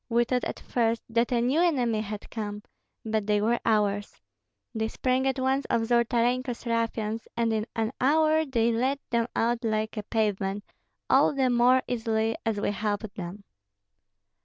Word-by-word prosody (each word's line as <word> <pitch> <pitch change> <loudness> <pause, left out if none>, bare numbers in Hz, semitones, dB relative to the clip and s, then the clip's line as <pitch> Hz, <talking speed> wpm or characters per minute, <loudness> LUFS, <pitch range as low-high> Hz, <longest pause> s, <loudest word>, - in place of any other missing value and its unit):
We 235 0 +3
thought 250 +1 -1
at - - -4
first 230 -1 0
that 235 +2 +1
a 240 -1 +2
new 265 +7 +2
enemy 245 -11 +2
had 210 -1 -6
come, 210 -2 -5 0.4
but 215 -2 -1
they 210 -1 +3
were 230 +3 +1
ours. 205 -2 0 0.5
They 220 -1 -1
sprang 255 +3 0
at 265 0 0
once 265 +1 0
on 225 -1 +1
Zolotarenko's 240 +1 +1
ruffians, 230 -1 -1
and 230 -1 +1
in 215 0 -1
an 225 0 0
hour 310 +3 +4
they 235 -5 +1
laid 255 +5 +1
them 235 -1 +1
out 235 +1 +1
like 220 0 -1
a - - -1
pavement, 205 -2 -1 0.4
all - - +4
the 260 -2 +2
more 250 +2 +4
easily 225 -2 0
as 215 -2 0
we 205 - 0
helped 205 0 -3
them." 185 +3 -7
230 Hz, 165 wpm, -27 LUFS, 215-250 Hz, 0.5 s, hour